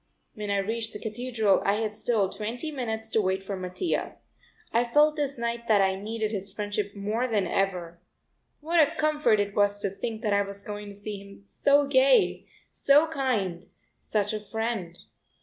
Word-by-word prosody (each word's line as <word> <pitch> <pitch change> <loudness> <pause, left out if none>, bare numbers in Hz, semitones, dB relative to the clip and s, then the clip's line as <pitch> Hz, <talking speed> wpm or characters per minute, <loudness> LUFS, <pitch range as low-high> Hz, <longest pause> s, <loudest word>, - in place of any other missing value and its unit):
When 210 -1 -5
I 200 - +2
reached 225 +3 -2
the 210 - -6
Cathedral 220 -2 +1
I 200 - +3
had 215 0 -1
still 210 -2 +1
twenty 235 - -4
minutes 220 -5 -3
to 220 - +3
wait 190 0 -1
for 195 0 -4
Mattia. 185 - -2 0.6
I 235 - +4
felt 295 +5 +4
this 285 -2 -1
night 235 0 -3
that 215 -2 +5
I 190 -1 +3
needed 215 +2 -3
his 195 -2 -4
friendship 205 0 -3
more 215 +5 -1
than 210 -5 +1
ever. 175 -2 -1 0.6
What 330 +3 +1
a 315 +1 +4
comfort 305 -8 +2
it 200 0 -1
was 205 0 +2
to 200 - -1
think 220 +2 -5
that 210 -2 +1
I 200 - +4
was 200 0 -6
going 205 0 -6
to 200 - -9
see 205 0 -6
him 200 0 -14
so 285 +7 +3
gay, 265 -1 +3 0.2
so 290 +3 +4
kind, 215 - -1 0.3
such 210 -1 -1
a 215 - -2
friend! 220 -5 -3
215 Hz, 185 wpm, -27 LUFS, 200-240 Hz, 0.6 s, that